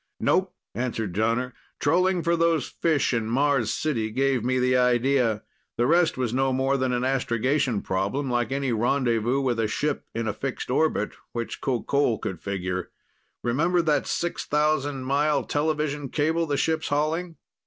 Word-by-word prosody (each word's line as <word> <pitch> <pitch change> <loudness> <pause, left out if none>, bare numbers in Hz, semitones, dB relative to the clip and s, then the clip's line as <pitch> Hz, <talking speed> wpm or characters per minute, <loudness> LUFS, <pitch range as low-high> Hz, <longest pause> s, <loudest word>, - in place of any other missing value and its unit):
"Nope," - - +1 0.2
answered 115 -4 -3
Jonner. 115 +5 0 0.3
"Trolling 180 +4 +2
for 170 0 +2
those 165 -4 +2
fish 150 -5 0
in 115 -2 0
Mars 130 -2 +2
City 115 -8 -1
gave 130 +1 +1
me 130 +1 +1
the 125 0 +2
idea. 125 -2 +2 0.3
The 120 - +2
rest 170 +3 +3
was 125 -3 -1
no 135 +1 +2
more 135 +1 +1
than 130 -1 0
an 125 0 0
astrogation 130 -1 0
problem, 100 +10 -1
like 120 -1 0
any 135 -1 -1
rendezvous 120 +1 +1
with 125 -4 0
a 110 - +1
ship 145 +7 -2
in 115 0 -2
a 105 - 0
fixed 130 +3 -4
orbit, 135 -6 +1 0.2
which 115 -1 -4
Qoqol 130 -1 +1
could 90 -4 -4
figure. 95 -2 -3 0.5
Remember 165 +9 +2
that 150 -4 +1
6,000 150 -4 0
mile 145 +3 +1
television 150 -2 -1
cable 160 +4 0
the 145 -1 0
ship's 160 +1 0
hauling? 160 +4 -1
135 Hz, 155 wpm, -25 LUFS, 120-150 Hz, 0.5 s, rest